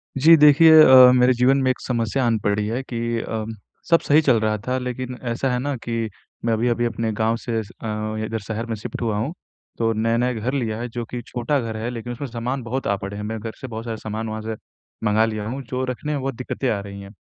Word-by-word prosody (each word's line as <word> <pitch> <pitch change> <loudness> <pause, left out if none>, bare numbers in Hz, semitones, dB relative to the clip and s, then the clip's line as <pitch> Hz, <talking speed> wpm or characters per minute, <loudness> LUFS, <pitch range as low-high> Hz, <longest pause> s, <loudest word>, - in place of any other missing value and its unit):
जी, 160 +5 +7
देखिए 155 +2 +8
अ, 130 -2 +9
मेरे 125 0 +5
जीवन 125 +3 +3
में 130 - +2
एक - - -5
समस्या 120 +1 -1
आन 115 -1 +2
पड़ी 105 0 0
है 120 +4 -2
कि 115 -2 -3
अम, 110 0 -4 0.3
सब 165 -1 +6
सही 150 +2 +4
चल 130 -7 +3
रहा 110 0 0
था 130 +1 0
लेकिन 125 0 -4
ऐसा 130 +3 -1
है 125 - 0
ना 140 +2 -2
कि 115 -1 -2 0.4
मैं 115 - +2
अभी-अभी 120 +1 +1
अपने 115 -1 -2
गाँव 110 +1 +2
से 115 -1 -2
स 100 - -15
अ, 110 0 -3
इधर 110 +1 -3
शहर 115 +1 -3
में 115 -1 -3
शिफ्ट 105 - -7
हुआ 110 -3 0
हूँ। 135 +10 -2 0.4
तो 115 -1 +1
नया-नया 115 +3 +1
घर 120 +3 -3
लिया 115 -6 -1
है 120 - -3
जो 120 +1 -4
कि 120 +2 -6
छोटा 125 +4 -1
घर 115 -3 -4
है 110 +2 -3
लेकिन 120 0 -5
उसमें 140 +4 -5
सामान 125 +2 -4
बहुत 130 +3 -3
आ 100 - +2
पड़े 100 +1 -6
हैं। 105 - -5
मैं 110 +1 -4
घर 110 +1 -5
से 130 - -5
बहुत 115 -1 -7
सारे 115 -1 -4
सामान 110 +1 -5
वहाँ 110 0 -4
से 110 0 -4 0.5
मँगा 110 +1 +3
लिया 110 -2 -3
हूँ 130 +4 -4
जो 130 0 -2
रखने 130 +4 -4
में 145 - -2
बहुत 135 -1 -3
दिक्कतें 125 +1 -3
आ 105 - 0
रही 100 0 -9
हैं। 100 - -10
115 Hz, 250 wpm, -22 LUFS, 110-130 Hz, 0.5 s, अ